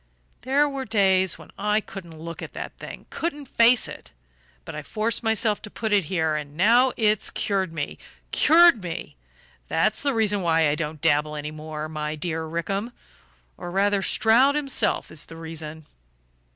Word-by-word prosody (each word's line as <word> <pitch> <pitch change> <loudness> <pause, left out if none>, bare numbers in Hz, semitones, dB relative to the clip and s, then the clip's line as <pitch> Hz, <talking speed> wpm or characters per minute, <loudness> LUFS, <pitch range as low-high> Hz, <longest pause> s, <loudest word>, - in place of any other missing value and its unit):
"There 280 +3 +2
were 275 -2 -4
days 190 -5 +2
when - - -14
I 210 +1 +2
couldn't 175 -6 -10
look 165 +1 -8
at - - -8
that - - -7
thing - - -9
couldn't 295 -4 -3
face 235 -1 +4
it. - - -10 0.5
But - - -7
I 150 - -5
forced 215 +9 -1
myself 220 -2 +1
to 210 - -8
put 220 0 -3
it 200 -4 +3
here; 160 -2 0
and 150 -1 -6
now 240 +7 +5
it's 215 -2 +2
cured 190 -4 -1
me 150 -3 -5 0.3
cured 325 -6 +6
me. 170 -3 -6 0.5
That's 210 +7 +1
the 280 -3 +1
reason 210 -3 +1
why 165 -2 +3
I 145 - +2
don't 155 -1 -4
dabble 150 +1 +2
any 150 0 -5
more, 155 0 -6
my 155 0 -4
dear 160 0 -3
Rickham; 195 +8 -3 0.6
or 175 - -7
rather 200 +2 +1
Stroud 245 +8 +4
himself 275 -7 0
is 155 0 -6
the 165 - -11
reason." 160 -1 -7
190 Hz, 170 wpm, -24 LUFS, 160-225 Hz, 0.6 s, cured